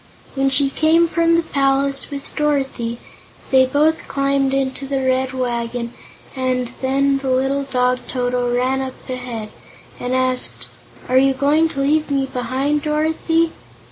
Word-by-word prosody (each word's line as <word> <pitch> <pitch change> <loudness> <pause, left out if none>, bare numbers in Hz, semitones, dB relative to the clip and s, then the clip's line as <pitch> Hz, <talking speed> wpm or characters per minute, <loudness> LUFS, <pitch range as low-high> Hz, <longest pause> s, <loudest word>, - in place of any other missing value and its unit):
When 270 0 +1
she 275 +1 +2
came 325 +3 +3
from 335 0 +2
the 335 - +2
palace 275 -2 +1
with 280 -1 -8
Dorothy, 270 -6 -1 0.5
they 260 -1 +5
both 300 +4 +1
climbed 275 -1 +1
into 270 0 -1
the 275 0 -1
Red 260 0 +1
Wagon 240 -2 -3 0.4
and 255 -2 -1
then 275 +1 +2
the 270 -1 -3
little 270 +2 +1
dog, 250 -1 +1
Toto, 245 -1 -1
ran 255 +2 +1
up 260 -1 -5
and 245 -4 -5 0.7
asked: 255 -1 -1 0.4
"Are 255 +1 +4
you 270 0 +3
going 295 +4 +3
to 275 - -3
leave 300 +2 +1
me 275 -1 +1
behind, 270 +3 -1
Dorothy?" 320 +2 +1
270 Hz, 140 wpm, -19 LUFS, 255-285 Hz, 0.7 s, they